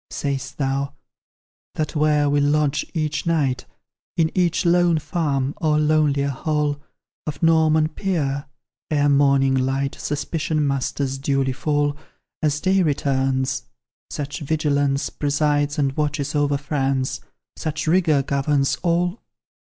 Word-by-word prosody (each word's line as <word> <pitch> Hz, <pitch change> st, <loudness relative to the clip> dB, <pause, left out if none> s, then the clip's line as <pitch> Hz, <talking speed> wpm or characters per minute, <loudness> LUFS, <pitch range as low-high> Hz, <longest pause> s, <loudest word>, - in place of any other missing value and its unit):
Sayst 140 Hz, -1 st, -3 dB
thou, 140 Hz, 0 st, -1 dB, 0.8 s
that 155 Hz, +1 st, -2 dB
where 150 Hz, -1 st, +3 dB
we 145 Hz, 0 st, +2 dB
lodge 145 Hz, 0 st, +2 dB
each 155 Hz, 0 st, -1 dB
night, 145 Hz, -6 st, 0 dB, 0.5 s
In 160 Hz, -1 st, +2 dB
each 175 Hz, -1 st, +1 dB
lone 175 Hz, -1 st, +4 dB
farm, 145 Hz, -4 st, -1 dB
or 155 Hz, -2 st, +1 dB
lonelier 150 Hz, -2 st, +2 dB
hall 145 Hz, +1 st, -1 dB, 0.5 s
Of 150 Hz, +1 st, -5 dB
Norman 160 Hz, -1 st, +4 dB
Peer 150 Hz, -5 st, -2 dB, 0.4 s
ere 145 Hz, -1 st, +2 dB
morning 140 Hz, -1 st, +4 dB
light 135 Hz, +1 st, 0 dB
Suspicion 150 Hz, +1 st, -2 dB
must 140 Hz, -1 st, -1 dB
as 135 Hz, -1 st, -1 dB
duly 135 Hz, -1 st, 0 dB
fall, 145 Hz, +1 st, 0 dB, 0.5 s
As 150 Hz, -2 st, +1 dB
day 190 Hz, +4 st, +2 dB
returns 135 Hz, -, 0 dB, 0.4 s
such 145 Hz, +2 st, -4 dB
vigilance 145 Hz, -2 st, 0 dB
Presides 145 Hz, 0 st, 0 dB
and 135 Hz, -2 st, 0 dB
watches 145 Hz, -1 st, -1 dB
over 145 Hz, -1 st, +1 dB
France, 135 Hz, -2 st, -1 dB, 0.4 s
Such 155 Hz, 0 st, -3 dB
rigour 160 Hz, -4 st, +3 dB
governs 140 Hz, 0 st, +1 dB
all? 175 Hz, +3 st, 0 dB
145 Hz, 120 wpm, -22 LUFS, 140-155 Hz, 0.8 s, lone